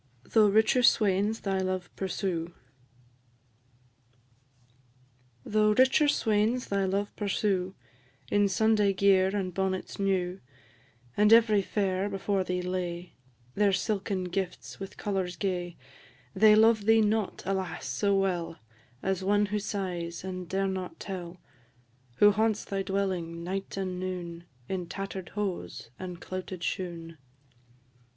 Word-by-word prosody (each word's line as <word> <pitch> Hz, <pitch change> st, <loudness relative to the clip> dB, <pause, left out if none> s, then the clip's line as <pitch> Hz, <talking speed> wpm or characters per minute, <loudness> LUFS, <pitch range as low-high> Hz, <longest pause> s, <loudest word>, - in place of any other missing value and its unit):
THOUGH 220 Hz, -2 st, +5 dB
RICHER 220 Hz, +5 st, +4 dB
SWAINS 210 Hz, -2 st, +3 dB
THY 195 Hz, -1 st, -1 dB
LOVE 185 Hz, -1 st, -3 dB
PURSUE. 175 Hz, -3 st, -3 dB, 2.9 s
Though 215 Hz, 0 st, +3 dB
richer 260 Hz, +5 st, +4 dB
swains 225 Hz, -1 st, +1 dB
thy 200 Hz, -1 st, +1 dB
love 200 Hz, +2 st, -2 dB
pursue, 195 Hz, -2 st, -1 dB, 0.6 s
In 205 Hz, 0 st, +4 dB
Sunday 210 Hz, 0 st, +3 dB
gear 190 Hz, -1 st, +4 dB
and 185 Hz, -3 st, -2 dB
bonnets 190 Hz, +1 st, -2 dB
new; 190 Hz, -2 st, 0 dB, 0.8 s
And 210 Hz, +1 st, +4 dB
every 225 Hz, -3 st, +6 dB
fair 195 Hz, 0 st, -1 dB
before 195 Hz, 0 st, -1 dB
thee 180 Hz, 0 st, -2 dB
lay 180 Hz, -1 st, -4 dB, 0.4 s
Their 205 Hz, -1 st, +3 dB
silken 195 Hz, -1 st, -1 dB
gifts, 180 Hz, 0 st, -4 dB
with 195 Hz, -1 st, -8 dB
colours 190 Hz, -3 st, -2 dB
gay 180 Hz, -3 st, -3 dB, 0.6 s
They 210 Hz, +2 st, +6 dB
love 220 Hz, -1 st, +4 dB
thee 225 Hz, 0 st, +5 dB
not, 215 Hz, -1 st, 0 dB
alas! 190 Hz, -2 st, -3 dB
so 200 Hz, -1 st, +1 dB
well 175 Hz, -4 st, -1 dB, 0.5 s
As 190 Hz, 0 st, -1 dB
one 205 Hz, +2 st, +3 dB
who 210 Hz, -, +1 dB
sighs, 180 Hz, -5 st, -4 dB
and 185 Hz, -2 st, -6 dB
dare 195 Hz, +1 st, 0 dB
not 185 Hz, -1 st, -4 dB
tell; 180 Hz, -3 st, -6 dB, 0.8 s
Who 205 Hz, +9 st, +6 dB
haunts 215 Hz, +1 st, 0 dB
thy 195 Hz, -1 st, -2 dB
dwelling, 185 Hz, -4 st, -2 dB
night 195 Hz, +2 st, -4 dB
and 185 Hz, -2 st, -3 dB
noon, 175 Hz, -2 st, -5 dB, 0.2 s
In 185 Hz, -2 st, -3 dB
tatter'd 195 Hz, 0 st, -6 dB
hose 185 Hz, -, -4 dB
and 180 Hz, -2 st, -6 dB
clouted 185 Hz, -1 st, -6 dB
shoon. 165 Hz, -3 st, -4 dB
195 Hz, 125 wpm, -29 LUFS, 180-205 Hz, 2.9 s, every